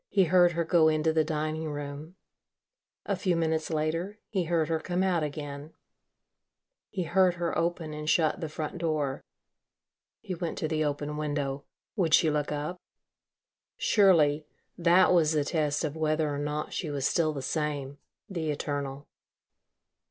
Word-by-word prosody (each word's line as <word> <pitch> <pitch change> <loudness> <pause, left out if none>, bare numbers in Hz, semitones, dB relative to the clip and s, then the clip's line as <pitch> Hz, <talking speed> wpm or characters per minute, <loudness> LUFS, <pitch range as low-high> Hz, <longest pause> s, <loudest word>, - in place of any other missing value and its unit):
He 195 -2 +4
heard 175 0 +4
her 170 +1 0
go 165 -1 +4
into 155 0 +2
the 160 0 +3
dining 155 0 -2
room.... 145 +3 -6 0.9
A 200 - 0
few 185 -1 0
minutes 160 -1 0
later, 165 +6 -2
he 190 -5 -1
heard 165 -2 +1
her 160 0 0
come 175 +3 -1
out 180 -3 +2
again. 145 0 -5 1.2
He 190 -3 -2
heard 180 +1 +3
her 170 -1 -2
open 165 -2 -1
and 150 0 -4
shut 160 -2 +2
the 160 - -3
front 155 +3 -5
door.... 155 -5 -1 1.0
He 190 - -5
went 170 -1 -4
to 155 - -1
the 155 0 0
open 150 0 -2
window. 145 -2 -2 0.3
Would 170 -7 +4
she 160 -4 +3
look 150 -1 -1
up? 150 +4 -3 1.0
Surely 155 -7 +4 0.3
that 175 +2 +5
was 165 -3 +4
the 150 -2 +1
test 150 -1 0
of 155 -1 -2
whether 155 -1 0
or 140 - -3
not 150 +1 -3
she 160 - -3
was 140 -2 -2
still 160 0 +2
the 140 -3 -5
same 145 -1 -3 0.3
the 170 -6 -3
eternal. 145 -1 -3
155 Hz, 160 wpm, -28 LUFS, 150-170 Hz, 1.2 s, that